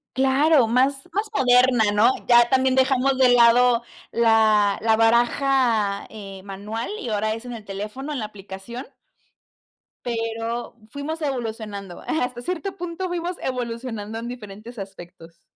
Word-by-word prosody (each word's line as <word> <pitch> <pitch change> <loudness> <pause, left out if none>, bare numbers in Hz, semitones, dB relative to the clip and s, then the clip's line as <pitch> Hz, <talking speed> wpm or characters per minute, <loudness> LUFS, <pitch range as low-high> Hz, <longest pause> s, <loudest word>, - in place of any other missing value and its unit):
Claro, 270 0 +4
más 270 +5 +1
más 415 +3 -1
moderna, 250 - +4
¿no? 210 +4 +5 0.2
Ya 240 -1 +6
también 260 0 +3
dejamos 265 0 +2
de 255 -1 +6
lado 240 0 +5 0.3
la 220 -3 +3
la 225 0 +3
baraja 235 -2 +2
eh, 195 -3 -9
manual 205 +4 -5
y 240 - -5
ahora 215 0 0
es 225 +2 -10
en 245 - -6
el 225 -2 -8
teléfono, 210 +9 -6
en 280 - -3
la 215 - -3
aplicación. 205 +4 -9 1.2
Pero, 230 0 -3
fuimos 295 +6 -5
evolucionando, 220 - -5
hasta 250 -5 -2
cierto 365 +7 -4
punto 355 +1 -4
fuimos 355 0 -3
evolucionando 230 -3 -4
en 230 - -6
diferentes 225 -1 -9
aspectos. 175 -3 -11
235 Hz, 135 wpm, -23 LUFS, 215-265 Hz, 1.2 s, Ya